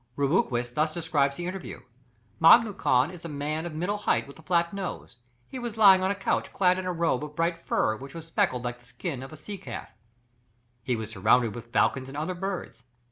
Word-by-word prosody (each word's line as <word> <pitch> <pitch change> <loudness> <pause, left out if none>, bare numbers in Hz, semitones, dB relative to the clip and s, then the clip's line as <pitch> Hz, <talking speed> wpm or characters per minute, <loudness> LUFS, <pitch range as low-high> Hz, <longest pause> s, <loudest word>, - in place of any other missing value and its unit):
Rubruquis 135 -5 +1
thus 155 +3 0
describes 150 -5 +1
the 175 - -4
interview: 185 +1 -6 0.6
"Mangu 210 +5 +7
Khan 130 +5 +2
is 175 -2 -11
a 170 - -6
man 150 +3 -3
of 160 - -8
middle 190 +6 -1
height - - +1
with 140 +2 -13
a - - -12
flat 170 +1 +1
nose; 190 -10 -6 0.3
he 260 - -7
was 240 -2 -5
lying 195 -3 +8
on 190 - +1
a 200 - 0
couch 195 - -1
clad 185 -1 +3
in 185 - -4
a - - 0
robe 165 -5 0
of 150 0 -8
bright 170 +1 +1
fur, 110 - +1
which 135 +4 -10
was 165 -1 -7
speckled 130 -6 0
like 120 0 -4
the 120 - -23
skin 135 0 -5
of 135 - -9
a 155 - -10
sea 200 +6 -8
calf." 120 -8 -7 0.9
He 125 +2 -1
was 110 -1 -5
surrounded 110 +2 +3
with 120 -1 -8
falcons 130 +1 +2
and 140 - -8
other 160 +5 -2
birds. 190 +1 -5
160 Hz, 220 wpm, -27 LUFS, 130-185 Hz, 0.9 s, lying